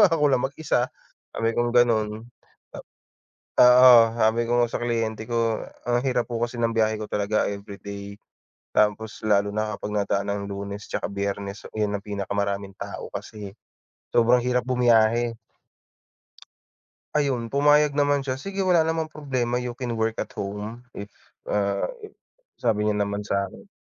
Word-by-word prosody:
ako 160 -7 +4
lang 130 - +3
mag-isa, 135 -3 -1 0.5
sabi 115 - +1
kong 120 +1 0
gano'n. 115 -3 +4 0.6
Ap - - -9 0.8
Oo, 125 +1 +9 0.2
sabi 115 0 +2
ko - - -2
nga 120 - +2
sa - - -2
kliyente 115 -2 -2
ko, 115 -2 0 0.3
"Ang 120 0 +2
hirap 125 -2 +1
po 115 - -2
kasi 120 +1 -2
ng 115 -1 0
biyahe 110 -1 +2
ko 105 0 -7
talaga 105 +1 0
everyday. 100 0 -8 0.6
Tapos, 105 +1 +1
lalo 100 -1 +3
na 110 +1 -2
kapag 105 - -6
nadaan 100 0 0
ng 100 0 -2
Lunes 100 +1 -6
tsaka - - -3
Biyernes, 100 0 -4
yun 105 -1 0
ang 100 - -15
pinakamaraming 100 -1 -3
tao - - -7
kasi, 105 -2 -7 0.7
sobrang 120 +1 +5
hirap 125 0 0
bumiyahe." 120 -2 +3 1.8
Ayun, 135 -6 0
pumayag 145 +1 +4
naman 145 -1 +1
siya. 130 0 -3
"Sige, 195 +1 -3
wala 180 -3 +4
namang 160 -1 -2
problema. 125 -5 -2
You 125 -1 -5
can 125 -2 -3
work 110 0 0
at - - -4
home 105 +3 -5 0.2
if, 100 0 -8 0.3
ah" 100 -1 0 0.8
sabi 105 0 +1
niya 105 - +1
naman 100 0 -3
sakin. 100 -2 -3
115 Hz, 150 wpm, -24 LUFS, 100-125 Hz, 1.8 s, Oo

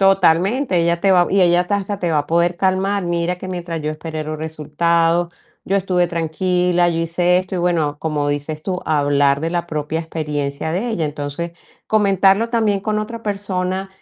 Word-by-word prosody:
Totalmente, 195 - +3
ella 170 0 +1
te 195 +1 +4
va 175 -1 +4
y 195 - +3
ella 175 -1 +4
hasta 180 +3 0
hasta 200 0 -4
te 175 - 0
va 155 - +2
a 145 - -2
poder 170 +2 +1
calmar: 190 +1 +1
"Mira, 175 +1 -1
que 180 - -8
mientras 175 -3 -4
yo 155 0 -2
esperé 155 0 -5
los 155 0 -4
resultados, 165 +2 0 0.3
yo 195 - +1
estuve 180 -2 +1
tranquila, 175 +1 +1
yo 165 -1 -1
hice 175 +2 +2
esto". 185 +1 -4
Y - - -1
bueno, 165 -4 0
como 150 -2 -1
dices 145 +2 -3
tú: 180 +1 -3
"Hablar 145 -2 +2
de 165 +1 -2
la 175 0 -2
propia 155 +1 -2
experiencia 150 -2 -3
de 195 +8 -1
ella". 175 -8 -1
Entonces, 150 +3 -4 0.3
comentarlo 200 +1 +3
también 220 -4 +1
con 210 +1 -1
otra 225 +2 -5
persona 195 -2 -2
175 Hz, 190 wpm, -19 LUFS, 160-190 Hz, 0.3 s, te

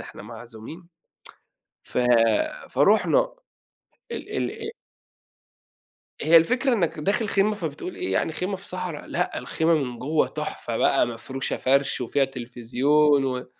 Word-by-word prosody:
إحنا - - -10
معزومين 120 +10 -10 1.0
ف - - -7 0.7
فرُحنا. - - +3 0.8
ال - - -6 0.3
ال 440 - -4 1.5
هي 165 +2 +5
الفكرة 250 +11 +3
إنك 170 -8 0
داخل 205 +7 0
خيمة، 205 +2 +2
فبتقول 165 -1 -5
إيه 95 - -3
يعني؟ 125 +11 0
خيمة 185 +4 -3
في 195 - -12
صحرا؟! 180 -5 -5
لأ، 180 - -2
الخيمة 165 +1 +1
من 125 -6 -2
جوّه 150 +4 +1
تحفة - - -4
بقى، - - +3
مفروشة 130 +3 -4
فرش 135 +1 +1
وفيها 135 +3 +1
تلفزيون 135 +3 +1
و 125 -1 -2
150 Hz, 125 wpm, -25 LUFS, 130-185 Hz, 1.5 s, هي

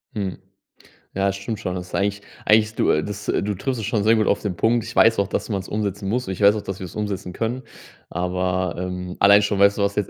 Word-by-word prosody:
Hm, 100 -3 -3 0.8
ja, 95 +1 +1
das 100 0 0
stimmt 100 +3 -5
schon. 90 - -3
Das 90 0 -6
ist - - -13
eigentlich 100 +1 0 0.2
eigentlich, 110 0 +5
es 110 - -12
du, - - +2
äh, 75 - +2
das, 105 +2 -6
äh - - +1
du 105 +1 -1
triffst 125 +5 -3
es 105 - -3
schon 110 -3 0
sehr 110 +1 +5
gut 110 -1 +2
auf - - +2
den 100 -4 -3
Punkt. 115 +3 +2
Ich 115 +1 -8
weiß 115 0 +5
auch, 100 -1 +1
dass - - -2
man‘s 100 -3 -3
umsetzen 100 -2 -3
muss 125 +5 -1
und 95 - -3
ich - - -11
weiß 100 +1 +7
auch, 105 - -4
dass 95 -1 -6
wir's 90 -2 -7
umsetzen 100 -3 -3
können. 120 +6 -3 0.5
Aber, 90 0 -1
ähm, 90 0 -5
allein 100 +1 +7
schon, 105 -1 0
weißt 100 +1 +4
du, - - +1
weißt 100 0 0
du - - +4
was, - - -12
100 Hz, 280 wpm, -22 LUFS, 95-110 Hz, 0.8 s, weiß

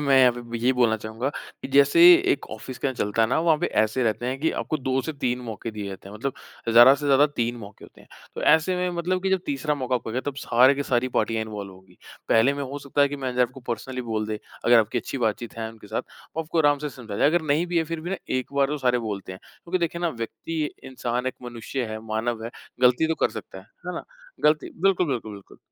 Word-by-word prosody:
मैं 140 -2 +4
यहाँ 125 -2 +6
पे 120 -1 -6
यही 125 +3 +3
बोलना 120 -3 +3
चाहूँगा, 110 +4 -4 0.3
कि - - -5
जैसे 140 - +5 0.3
1 - - -4
ऑफ़िस 125 +4 -8
के - - -1
यहाँ 130 - -1
चलता 110 -1 0
है 110 - +2
ना - - +1
वहाँ 165 -2 +4
पे - - 0
ऐसे 110 +4 +1
रहते 120 +1 0
हैं 130 +1 -2
कि 160 - +2
आपको 155 - -2
2 130 0 0
से 160 - -4
3 125 -4 -1
मौके 110 +1 -5
दिए 105 -2 -6
जाते 95 0 -9
हैं 100 - -10
मतलब 130 +6 -3 0.4
ज़्यादा 120 +4 +8
से 145 +1 -4
ज़्यादा 140 +1 +5
3 120 -4 -2
मौके 105 -2 -11
होते - - -17
हैं। - - -19 0.3
तो - - -5
ऐसे 160 +4 +4
में 180 0 0
मतलब 185 +2 -1
कि 190 - 0
जब 190 -1 +2
तीसरा 145 +1 -1
मौका 130 -3 -2
आपको 120 -2 -2
हो - - -6
गया 130 - -1
तब 135 - -15
सारे 130 +1 +4
की 140 - -2
सारी 130 -2 0
पार्टियाँ 115 -1 +1
इन्वॉल्व 105 -3 -7
होंगी, 95 0 -19 0.3
पहले 115 +5 +4
में 140 - -4
हो 140 +2 -5
सकता 140 0 -2
है 140 - +4
कि 145 - -5
मैं 130 -2 -3
आपको 125 +2 -3
पर्सनली 125 +2 -3
बोल 110 -2 -2
दे 110 -1 -3 0.3
अगर 120 0 +7
आपकी 115 +2 +1
अच्छी 130 +4 -5
बात-चीत 115 0 -2
है 110 -1 -3
उनके 110 -2 -15
साथ, 110 +2 -2 0.3
वो 160 - 0
आपको 165 +1 -3
आराम 145 -2 +4
से 150 +1 -3
समझा 110 -6 -8
जाए। 140 - +4
अगर 170 +2 +2
नहीं 155 +3 +1
भी 175 -1 0
है 165 - +1
फिर 165 0 -5
भी 175 +3 -5
ना 195 - -1 0.2
एक 130 +1 -4
बार 140 -1 +3
तो 150 +2 -3
सारे 125 -2 +2
बोलते 100 -4 -5
हैं, 95 - -9 0.3
क्योंकि 185 +2 -1
देखिए 170 0 -2
ना 175 - +1
व्यक्ति 150 +6 -5 0.2
इंसान 125 -1 -3
एक 130 - -1
मनुष्य 120 +2 -4
है, 110 0 -5
मानव 110 +1 -2
है, 115 - -5 0.3
गलती 125 +5 +5
तो 160 - +1
कर - - +2
सकता - - -8
है, - - -13 0.2
है - - -3
ना? - - -5 0.4
गलती 150 -1 +3
बिल्कुल, 190 -2 +3
बिल्कुल, 120 -6 -3
बिल्कुल। 100 -1 -13
130 Hz, 265 wpm, -25 LUFS, 115-145 Hz, 0.4 s, ज़्यादा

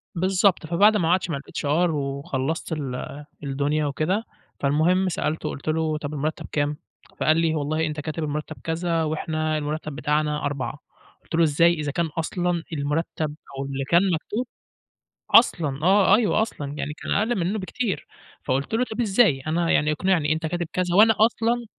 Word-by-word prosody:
بالضبط، 185 0 +2
فبعد 205 +6 +5
ما 165 -4 +1
قعدت 180 -1 +2
مع 140 - -1
الHR 155 +4 0
وخلّصت 140 +1 -3
ال 145 0 -5 0.2
الدنيا 145 +2 0
وكده، 155 - 0 0.4
فالمهم 170 +7 +2
سألته، 155 -1 -2
قُلت 140 - -8
له: 155 -1 0
"طب، 150 0 -5
المرتّب 150 +2 -3
كام؟" 145 0 0 0.4
فقال 155 +1 +3
لي: 165 -1 +2
"والله 155 +2 0
أنت 150 0 -3
كاتب 155 +1 -4
المرتّب 150 +1 -4
كذا، 165 0 0
وإحنا 155 0 -1
المرتّب 150 0 -4
بتاعنا 150 0 0
4" 140 0 -3 0.4
قُلت - - -5
له: 170 - +4
"إزاي؟ 165 +3 +4
إذا 150 -3 -3
كان 170 +3 0
أصلًا 175 +1 -1
المرتّب 150 +1 -2 0.2
أو 135 - -3
اللي 135 0 -3
كان 170 +6 +4
مكتوب 215 +10 -3 0.8
أصلًا 150 - +4
آه، 195 +1 +6
أيوه 220 -1 +2
أصلًا، 145 -10 -4
يعني 150 +1 -3
كان - - -7
أقل 220 +1 +1
منّه 190 +5 -1
بكتير." 200 +2 -3 0.4
فقُلت 135 +8 -1
له: 235 - +2
"طب، 230 +2 -2
إزاي؟ 200 - +3
أنا 165 +2 +1
يعني 150 +1 +3
اقنعني. 155 -2 +1
أنت 160 +1 -3
كاتب 175 +1 -2
كذا 180 -1 0
وأنا 220 +1 +7
أصلًا" 230 +2 +2
160 Hz, 165 wpm, -24 LUFS, 150-180 Hz, 0.8 s, وأنا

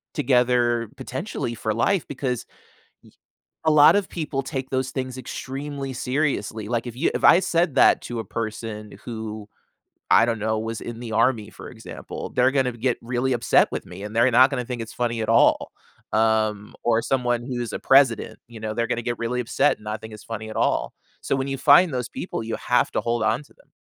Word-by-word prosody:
together 120 -2 +2
potentially 120 - -4
for 110 0 -2
life 160 - +1
because 130 -3 -3 0.6
ye - - -20 0.5
a - - +5
lot 150 +3 +7
of 200 -2 0
people 150 -5 -3
take 135 -1 -5
those 130 -1 -1
things 130 -1 -4
extremely 135 +2 -5
seriously, 125 -5 -2
like, 120 0 -1
if 120 0 -7
you 155 - +1
if - - -2
I 180 - +8
said 170 -5 +1
that - - +6
to 120 -2 -4
a - - -5
person 110 -1 -6
who, 110 -2 -6 0.6
I - - +7
don't 115 -2 -1
know, 110 0 0
was 115 0 -4
in 120 0 -7
the 115 -2 -6
army 115 -1 +2
for - - -11
example, - - -8
they're 125 +1 +4
gonna 130 -3 +1
get 120 +2 -1
really 125 +2 -1
upset 120 -1 +3
with - - -4
me 90 +3 -10
and 105 +1 -7
they're 120 +3 +5
not 130 +3 +6
gonna 125 -4 -2
think 125 -3 -4
it's 115 - -8
funny 120 -2 -1
at 110 - -1
all. 115 - +3 0.4
Um, 110 -1 +1
or 115 -1 +3
someone 120 -2 0
who's 120 -3 -4
a - - -3
president, 135 -5 +3
you 115 -2 -11
know, 110 0 -4
they're 115 0 0
gonna 120 - -1
get 120 0 -3
really 120 +1 -2
upset 120 - +1
and 105 - -18
not 105 +1 -4
think 110 0 -9
it's 105 - -12
funny 110 -1 -6
at 110 - -8
all. - - 0 0.3
So 135 - 0
when 135 +1 -2
you 135 - -2
find 160 +6 +6
those 125 -1 -2
people, 170 - -5
you 115 - -3
have 125 - +1
to - - 0
hold 120 -1 -1
on 110 +6 +1
to - - -23
them. - - -26
120 Hz, 210 wpm, -23 LUFS, 110-130 Hz, 0.6 s, I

